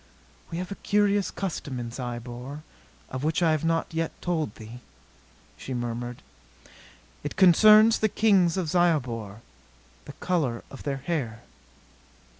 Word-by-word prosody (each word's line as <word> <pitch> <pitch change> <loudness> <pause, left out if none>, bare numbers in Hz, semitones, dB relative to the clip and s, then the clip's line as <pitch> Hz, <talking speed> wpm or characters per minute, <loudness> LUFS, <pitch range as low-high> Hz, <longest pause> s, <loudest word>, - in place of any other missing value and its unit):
"We 165 - -5
have 180 +2 -5
a 200 - -7
curious 205 -1 +2
custom 150 -9 -4
in 120 -1 -5
Zyobor 125 +3 -6 0.5
of 130 +1 -4
which 160 +4 +1
I 165 - +4
have 155 -1 0
not 165 0 0
yet 165 0 -3
told 160 - -2
thee," 110 +2 -10 0.8
she 130 - -6
murmured. 120 0 -4 1.0
"It 145 - -5
concerns 215 +4 +7
the 215 - +2
kings 195 -5 +3
of 180 -3 -1
Zyobor. 125 - 0 0.6
The 145 - -9
color 145 -11 -1
of 135 - -10
their 140 -2 -2
hair." 130 -10 -3
155 Hz, 135 wpm, -26 LUFS, 120-180 Hz, 1.0 s, concerns